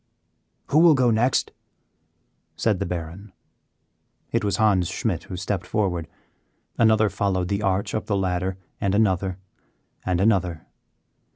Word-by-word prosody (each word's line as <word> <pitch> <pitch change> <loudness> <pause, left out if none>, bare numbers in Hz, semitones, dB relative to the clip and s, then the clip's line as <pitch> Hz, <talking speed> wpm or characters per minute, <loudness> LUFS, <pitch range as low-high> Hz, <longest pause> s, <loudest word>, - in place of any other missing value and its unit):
"Who 150 - +4
will 165 -2 +7
go 125 -3 +3
next?" 120 +4 +1 1.0
said - - 0
the - - -2
Baron. 90 +4 -6 1.0
It 115 0 0
was 100 -2 0
Hans 100 -5 +3
Schmidt - - -2
who 90 - -7
stepped 95 0 -3
forward. 90 -6 -1 0.7
Another 110 -1 +4
followed 95 -2 -1
the 100 +1 -1
arch 95 -1 0
up 110 - -3
the 100 - +1
ladder, 95 0 -1 0.2
and 100 0 0
another, 95 -3 +1 0.7
and 90 -2 0
another. 90 -6 +1
95 Hz, 130 wpm, -24 LUFS, 90-110 Hz, 1.0 s, will